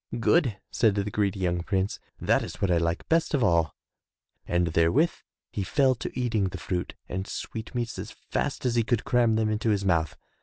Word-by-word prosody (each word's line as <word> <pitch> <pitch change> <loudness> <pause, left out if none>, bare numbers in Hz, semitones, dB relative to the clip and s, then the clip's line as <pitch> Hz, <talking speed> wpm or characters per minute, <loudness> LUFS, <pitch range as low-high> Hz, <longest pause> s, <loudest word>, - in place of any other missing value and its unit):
''Good/* 120 - +2 0.2
said 110 -4 +3
the 100 0 -1
greedy 100 -1 0
young 90 -1 +1
prince, 95 +2 -1 0.2
"that - - +2
is - - -6
what 95 - +1
I 85 - +4
like 85 0 -1
best 165 -1 +2
of 130 - +1
all," 85 -6 +2 0.7
and 85 0 +2
therewith 85 - +3 0.4
he - - -3
fell 130 +6 +3
to 125 +1 -5
eating 115 -5 +1
the 95 - -3
fruit 90 -1 -3
and 95 +2 -4
sweetmeats 115 -1 -4
as 105 +3 -5
fast 145 -2 -3
as 125 - +2
he 115 -1 +3
could 115 -1 0
cram 120 -3 +3
them 110 -1 +1
into 110 +1 0
his 100 -2 +1
mouth. 80 -4 +1
105 Hz, 195 wpm, -27 LUFS, 90-120 Hz, 0.7 s, I